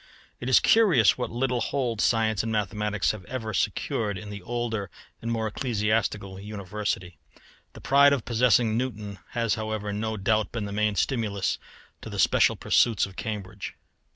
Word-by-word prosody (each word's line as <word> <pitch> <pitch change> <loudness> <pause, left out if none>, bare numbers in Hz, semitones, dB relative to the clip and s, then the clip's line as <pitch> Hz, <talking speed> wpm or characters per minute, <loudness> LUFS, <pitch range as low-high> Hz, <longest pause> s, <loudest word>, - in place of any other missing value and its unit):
It 120 - -4
is 130 - +7
curious 185 - +5
what 125 -2 -3
little 125 0 -1
hold 120 -4 -1
science 110 -3 +2
and 115 - -3
mathematics 105 -1 0
have 105 -3 -8
ever 115 -4 -4
secured 105 +2 -1
in 105 +1 -8
the 100 -1 -7
older 115 -1 -3 0.3
and 115 - -3
more 115 -1 -1
ecclesiastical 105 -4 -1
University. 100 -2 -4 0.5
The - - -12
pride 140 +2 +6
of 140 -5 0
possessing 115 -2 +3
Newton 105 -5 -3
has 115 -2 +1
however 110 -2 -3
no 110 +1 -2
doubt 110 +1 +1
been 115 -3 -3
the 100 - -5
main 105 0 +1
stimulus 105 -5 0 0.4
to - - -8
the - - -6
special - - +4
pursuits 115 -4 +3
of 95 -1 -12
Cambridge. 105 -2 -5
110 Hz, 160 wpm, -26 LUFS, 105-120 Hz, 0.5 s, is